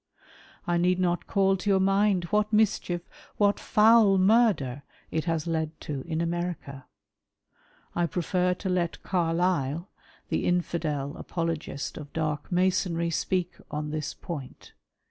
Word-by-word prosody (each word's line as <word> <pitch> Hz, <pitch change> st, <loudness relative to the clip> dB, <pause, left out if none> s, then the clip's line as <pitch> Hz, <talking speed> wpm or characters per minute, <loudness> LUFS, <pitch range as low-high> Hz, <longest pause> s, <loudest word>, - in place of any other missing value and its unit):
I 175 Hz, -2 st, +1 dB
need 180 Hz, +1 st, +2 dB
not 175 Hz, -1 st, 0 dB
call 195 Hz, -1 st, +3 dB
to 195 Hz, +3 st, -3 dB
youi' 195 Hz, -1 st, +4 dB
mind 195 Hz, -1 st, +3 dB
what 210 Hz, 0 st, +2 dB
mischief 210 Hz, -5 st, +1 dB, 0.2 s
— -, -, -24 dB
what 205 Hz, -1 st, +3 dB
foul 215 Hz, -2 st, +5 dB
murder 185 Hz, -, +3 dB, 0.2 s
— -, -, -32 dB
it 160 Hz, 0 st, -1 dB
has 165 Hz, -2 st, -1 dB
led 160 Hz, -2 st, -2 dB
to 145 Hz, -3 st, -4 dB
in 160 Hz, -1 st, -1 dB
America. 170 Hz, -6 st, -4 dB, 1.1 s
I 175 Hz, 0 st, +1 dB
prefer 180 Hz, +2 st, 0 dB
to 190 Hz, -, -6 dB
let 175 Hz, -2 st, -1 dB
Carlile, 170 Hz, -2 st, 0 dB, 0.4 s
the -, -, 0 dB
Infidel 160 Hz, -5 st, -1 dB
apologist 165 Hz, -4 st, -4 dB
of 145 Hz, -, -10 dB
dark 155 Hz, 0 st, -2 dB
Masonry, 180 Hz, -2 st, +1 dB
speak 180 Hz, +1 st, -1 dB, 0.2 s
on 150 Hz, 0 st, -4 dB
this 155 Hz, -1 st, -3 dB
point. 145 Hz, -7 st, -8 dB
175 Hz, 140 wpm, -27 LUFS, 160-190 Hz, 1.1 s, foul